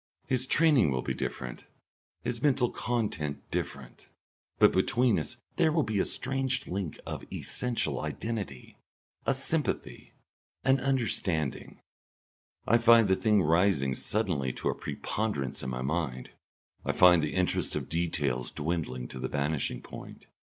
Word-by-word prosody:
His 130 0 0
training 150 - +4
will 65 -2 -1
be - - -1
different, 60 -1 -5 0.6
his 120 -1 -2
mental 135 -4 +3
content 100 -12 -2
different. 65 -3 -5 0.5
But - - +6
between 120 +5 +3
us 120 - -5 0.2
there 160 -2 +4
will 155 -1 +2
be 110 -5 -1
a - - +2
strange 130 0 0
link 90 -3 -4
of - - -5
essential 125 -2 -1
identity, 105 - -5 0.5
a - - +3
sympathy, - - -2 0.5
an 135 0 +4
understanding. 105 - -1 0.8
I 115 +2 +4
find 115 -2 +7
the 95 - +5
thing 105 -2 +3
rising 80 -5 +3
suddenly 85 - -1
to - - -2
a - - +1
preponderance 100 - -3
in 65 - -4
my 65 0 -3
mind. 70 -4 -2 0.5
I - - 0
find 90 -2 +7
the 75 0 -2
interest 90 -1 +1
of - - -3
details 75 -7 -1
dwindling 75 -6 -3
to 65 - -7
the - - -2
vanishing 70 0 -1
point. - - -10
90 Hz, 140 wpm, -29 LUFS, 70-120 Hz, 0.8 s, find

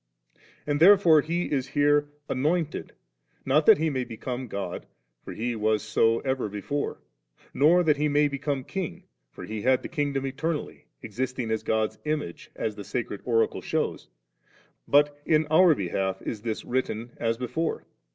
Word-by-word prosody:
And 145 -1 0
therefore 175 -3 +7
He 170 +4 -2
is 135 -3 0
here 145 0 +2 0.2
'anofnted,' 155 +4 -1 0.6
not 150 +3 +2
that - - +9
He 160 +1 0
may 130 -2 -1
become 125 +2 -5
God, 100 -4 -5 0.4
for - - -8
He 120 +1 -3
was 110 -1 +1
so 115 +1 +2
even 130 -4 -1
before; 125 +8 -3 0.6
nor 170 +5 +5
that 150 -3 +3
He 150 +1 +1
may 145 0 +3
become 140 -1 -3
King, 190 +3 -5 0.3
for - - -11
He 110 -1 -5
had 130 +3 +2
the - - -6
Kingdom 140 -2 -1
eternally, 150 +4 -4 0.2
existing 125 +1 -3
as 110 - 0
God's 110 -1 -1
Image, 150 - -4
as 110 - -3
the 105 - -7
sacred 110 -3 -4
Oracle 115 -2 +1
shews; - - -2 0.8
but 145 0 +3
in 155 0 +3
our 170 0 +6
behalf 95 -1 -2
is 105 - -4
this 110 -1 -4
written, 120 -2 -2
as 115 0 -1
before. 155 +7 -3
135 Hz, 160 wpm, -26 LUFS, 115-150 Hz, 0.8 s, that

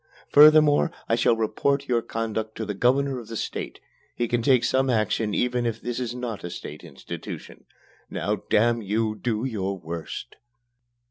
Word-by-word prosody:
Furthermore, 150 +1 +7 0.2
I - - +1
shall 115 0 +3
report 140 +5 0
your 120 -2 +2
conduct 110 -1 -3
to 110 - -4
the 105 - -3
Governor 130 +5 +1
of 115 - -11
the 115 0 -5
State. - - -5 0.4
He 120 - -1
can 120 +1 0
take 125 0 +4
some 135 0 +2
action 110 -2 +1
even 125 -1 +1
if 115 -1 -3
this 120 +1 -4
is 120 -1 -3
not 120 -4 -5
a 90 - -4
state 75 -3 -8
institution. 75 -6 -9 0.4
Now, - - -1
damn 115 +2 +3
you, 110 +2 0
do 110 +1 -2
your 100 -6 -2
worst!" 85 -1 -7
115 Hz, 170 wpm, -25 LUFS, 110-125 Hz, 0.4 s, Furthermore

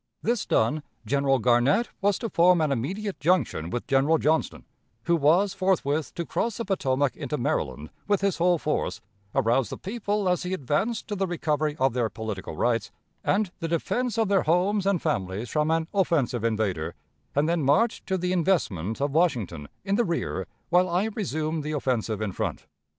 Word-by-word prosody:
This 235 -1 0
done, 120 +8 +2 0.2
General 140 +3 +2
Garnett 125 - +3
was 200 0 +2
to 230 - -4
form 175 +1 +5
an 155 -2 +1
immediate 190 - -3
junction 145 - +1
with 120 +6 -3
General 140 +4 +3
Johnston, 155 +1 0 0.4
who 170 - +2
was 170 +6 +3
forthwith 165 -6 0
to 170 - -3
cross 230 +5 -2
the 230 - -3
Potomac 140 -8 0
into - - -3
Maryland 75 +1 -2 0.2
with 205 -2 +2
his 195 -3 0
whole 175 0 +4
force, 150 -1 -2 0.4
arouse 120 -2 +2
the - - -6
people 205 -1 -2
as 180 -1 +2
he 180 +1 -2
advanced 185 - -1
to 210 - -3
the 195 -1 0
recovery 155 -3 -1
of 130 -2 +2
their 120 -3 0
political 110 -4 -6
rights, 115 -3 0 0.3
and 200 -2 +1
the 165 - -2
defense 230 +9 -1
of 225 -2 +2
their 195 -1 +3
homes 185 +5 +2
and 195 -4 +1
families 105 - -2
from 150 0 +1
an 160 0 +1
offensive 150 - +1
invader, 100 -8 -1 0.4
and 145 +2 +2
then 170 0 +1
march 150 - +2
to 190 -1 0
the 180 0 -1
investment 135 - 0
of 140 0 0
Washington, 120 - 0 0.2
in 200 +1 +1
the 240 - +3
rear, 170 -5 -2 0.2
while 180 +1 +4
I 185 +5 +1
resumed 160 -6 -2
the 155 +1 -3
offensive 115 -7 -1
in 100 - -2
front. - - -3
160 Hz, 180 wpm, -26 LUFS, 130-190 Hz, 0.4 s, form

